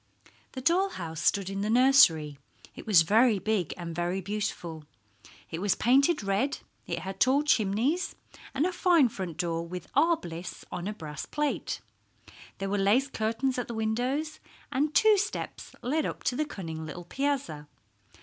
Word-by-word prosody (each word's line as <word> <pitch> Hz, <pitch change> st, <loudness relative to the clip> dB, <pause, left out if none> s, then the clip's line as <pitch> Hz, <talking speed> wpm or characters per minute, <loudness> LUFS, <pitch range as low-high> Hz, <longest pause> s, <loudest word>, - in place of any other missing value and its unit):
The 260 Hz, -, -5 dB
doll 360 Hz, +8 st, +3 dB
house 165 Hz, -, -6 dB
stood 200 Hz, -2 st, +2 dB
in 195 Hz, 0 st, -3 dB
the 210 Hz, -, -1 dB
nursery. 220 Hz, -, +5 dB, 0.4 s
It -, -, -11 dB
was 185 Hz, -6 st, +6 dB
very 220 Hz, +5 st, +4 dB
big 195 Hz, -4 st, -1 dB
and 170 Hz, -2 st, -6 dB
very 175 Hz, +2 st, -1 dB
beautiful. 180 Hz, -5 st, -4 dB, 0.7 s
It 165 Hz, -, -4 dB
was 200 Hz, -1 st, +2 dB
painted 275 Hz, +3 st, +3 dB
red; 200 Hz, +9 st, 0 dB, 0.3 s
it -, -, -2 dB
had 190 Hz, 0 st, -6 dB
tall 270 Hz, +3 st, +4 dB
chimneys, 245 Hz, -, +1 dB, 0.4 s
and 280 Hz, +4 st, +2 dB
a 370 Hz, -, 0 dB
fine 345 Hz, -8 st, +4 dB
front 185 Hz, -6 st, -6 dB
door 170 Hz, -2 st, -1 dB
with 180 Hz, 0 st, -6 dB
R. 325 Hz, +4 st, +4 dB
Bliss 170 Hz, -, -8 dB
on 180 Hz, +1 st, -4 dB
a 210 Hz, -, -2 dB
brass 150 Hz, -6 st, -7 dB
plate. 295 Hz, -1 st, -2 dB, 0.8 s
There 195 Hz, -, -3 dB
were 205 Hz, -, +1 dB
lace 225 Hz, +8 st, +3 dB
curtains 240 Hz, +2 st, -1 dB
at 245 Hz, -, -3 dB
the 235 Hz, -, -5 dB
windows, 250 Hz, +8 st, -1 dB, 0.3 s
and 290 Hz, +3 st, +1 dB
two 435 Hz, -2 st, +6 dB
steps 415 Hz, +3 st, -4 dB
led 300 Hz, +5 st, 0 dB
up -, -, -6 dB
to 250 Hz, -, 0 dB
the 305 Hz, -, 0 dB
cunning 165 Hz, -, -6 dB
little 160 Hz, +3 st, -8 dB
piazza. 265 Hz, -, -2 dB
220 Hz, 170 wpm, -28 LUFS, 175-275 Hz, 0.8 s, was